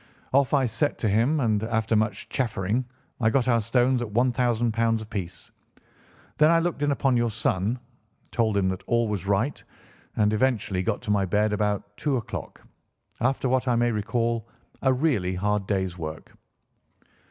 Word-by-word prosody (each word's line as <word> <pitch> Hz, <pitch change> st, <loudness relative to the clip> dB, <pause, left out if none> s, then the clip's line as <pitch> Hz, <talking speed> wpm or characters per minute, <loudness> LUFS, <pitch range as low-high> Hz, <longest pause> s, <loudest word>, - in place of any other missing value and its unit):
Off 140 Hz, -1 st, +3 dB
I 140 Hz, -3 st, +3 dB
set 115 Hz, +5 st, 0 dB
to 110 Hz, -, -1 dB
him, 115 Hz, +10 st, +2 dB
and 110 Hz, -4 st, +1 dB
after 110 Hz, 0 st, 0 dB
much 105 Hz, -2 st, 0 dB
chaffering 115 Hz, -1 st, -1 dB, 0.3 s
I 110 Hz, -2 st, +3 dB
got 130 Hz, +1 st, +1 dB
our 115 Hz, -2 st, +3 dB
stones 125 Hz, +3 st, +2 dB
at 120 Hz, -, -2 dB
£ -, -, -13 dB
1000 120 Hz, -1 st, +1 dB, 0.2 s
apiece. 95 Hz, -6 st, -7 dB, 0.9 s
Then 155 Hz, +1 st, +6 dB
I 170 Hz, -, +5 dB
looked 165 Hz, -2 st, -1 dB
in 145 Hz, -, +2 dB
upon 135 Hz, -2 st, +1 dB
your 120 Hz, 0 st, +1 dB
son, 105 Hz, +2 st, -1 dB, 0.5 s
told 110 Hz, -4 st, +1 dB
him 95 Hz, -2 st, +2 dB
that 95 Hz, 0 st, -3 dB
all 120 Hz, -1 st, +2 dB
was 100 Hz, -3 st, -3 dB
right, 105 Hz, +8 st, 0 dB, 0.5 s
and 105 Hz, 0 st, +2 dB
eventually 110 Hz, -5 st, +1 dB
got 100 Hz, +5 st, -2 dB
to 110 Hz, -, -2 dB
my 100 Hz, -2 st, +2 dB
bed 105 Hz, +3 st, +1 dB
about 105 Hz, 0 st, -1 dB
two 140 Hz, -3 st, 0 dB
o'clock, 115 Hz, -, -7 dB, 0.6 s
after 130 Hz, +2 st, +1 dB
what 130 Hz, +1 st, +1 dB
I 125 Hz, -, +3 dB
may 115 Hz, -2 st, +1 dB
call 115 Hz, +1 st, -1 dB, 0.3 s
a 130 Hz, -, +3 dB
really 125 Hz, -, +1 dB
hard 105 Hz, +1 st, -1 dB
day's 95 Hz, -3 st, -1 dB
work." 80 Hz, -1 st, -7 dB
115 Hz, 170 wpm, -25 LUFS, 105-125 Hz, 0.9 s, Then